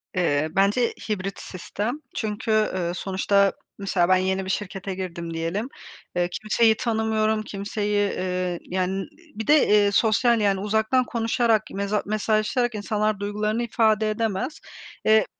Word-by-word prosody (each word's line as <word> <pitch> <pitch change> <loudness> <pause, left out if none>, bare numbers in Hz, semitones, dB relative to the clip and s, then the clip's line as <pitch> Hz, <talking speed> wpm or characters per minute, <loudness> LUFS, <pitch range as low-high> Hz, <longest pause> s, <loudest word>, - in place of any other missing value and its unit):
Eee, 155 -4 +1
bence 205 +5 +2 0.2
hibrit 195 -2 -3
sistem. 210 - -4 0.2
Çünkü, 215 0 -2
ııı, 185 -5 +1
sonuçta, 195 +1 +2 0.2
mesela, 190 -3 +1
ben 185 - +6
yeni 190 +1 0
bir - - -5
şirkete 195 -1 -3
girdim 170 -3 -5
diyelim. 170 +9 -2 0.5
Eee, 175 0 +1
kimseyi 220 +3 +2
tanımıyorum, 220 -1 0
kimseyi, 205 0 -1
ııı, 180 -1 -2
yani, 185 +1 -2 0.3
bir 220 - -5
de, 285 -8 +5
ııı, 200 - +2
sosyal, 225 +2 +3
yani, 195 -2 +2
uzaktan 220 +5 +1
konuşarak, 230 -1 +1
meza 200 +1 -1
mesajlaşarak 215 +3 0
insanlar 210 0 -1
duygularını 210 +3 -1
ifade 220 -2 +2
edemez. 220 +7 -2 0.5
Eee, 220 0 +5
210 Hz, 135 wpm, -24 LUFS, 190-220 Hz, 0.5 s, ben